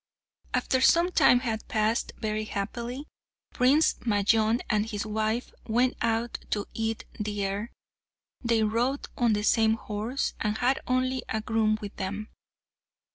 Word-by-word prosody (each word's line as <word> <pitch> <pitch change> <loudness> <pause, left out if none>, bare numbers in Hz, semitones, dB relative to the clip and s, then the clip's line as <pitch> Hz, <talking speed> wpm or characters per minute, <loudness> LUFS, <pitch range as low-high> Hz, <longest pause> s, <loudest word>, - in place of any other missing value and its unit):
After 260 - +1
some 340 +6 +5
time 245 -7 +5
had 225 -3 -3
passed 220 +1 0
very 215 -1 -2
happily, 235 +7 -4 0.5
Prince 275 +6 +4
Majnun 220 +1 +2
and 215 0 +1
his 205 -1 -3
wife 220 +2 -1
went 245 +3 +2
out 230 +1 0
to 205 -1 -1
eat 225 0 -2
the 205 -1 -2
air. 200 +4 -3 0.7
They 230 -2 +2
rode 240 +6 0
on 235 -3 +2
the 210 0 0
same 220 0 +4
horse, 220 +4 -3
and 215 0 0
had 255 +3 +2
only 255 0 +1
a 220 - 0
groom 220 0 +1
with 205 -1 -7
them. 200 +3 -4
220 Hz, 140 wpm, -27 LUFS, 215-245 Hz, 0.7 s, some